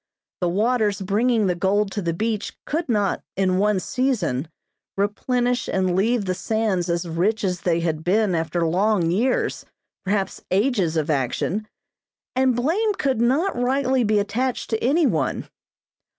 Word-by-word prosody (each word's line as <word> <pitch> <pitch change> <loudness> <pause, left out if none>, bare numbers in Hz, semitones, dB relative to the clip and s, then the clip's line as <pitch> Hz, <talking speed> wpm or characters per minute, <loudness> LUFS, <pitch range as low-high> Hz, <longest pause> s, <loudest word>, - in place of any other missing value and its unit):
The 180 - 0
waters 210 +1 +1
bringing 215 +4 +1
the 180 - +2
gold 195 +3 +1
to 205 - -3
the 170 -2 -1
beach 215 +5 -3
could 315 -1 -2
not, 205 -4 +1
in 185 -1 +1
one 210 -1 +2
season, 185 - -1 0.5
replenish 245 +4 0
and 185 -2 0
leave 220 +3 +1
the 185 - 0
sands 200 -3 -1
as 170 0 -1
rich 185 +7 0
as 180 -3 -1
they 170 -2 +1
had 160 -2 -2
been 205 +2 +2
after 165 +1 0
long 180 0 +2
years, 240 +8 0 0.4
perhaps 195 0 -1
ages 195 -5 +1
of 155 0 0
action, 150 - -1 0.7
and 260 -1 +3
blame 375 - +1
could 265 - 0
not 285 +11 +2
rightly 260 +1 +1
be 215 -1 +2
attached 235 +6 -1
to 220 - -1
any 300 +7 +3
one. - - -1
205 Hz, 150 wpm, -23 LUFS, 180-245 Hz, 0.7 s, and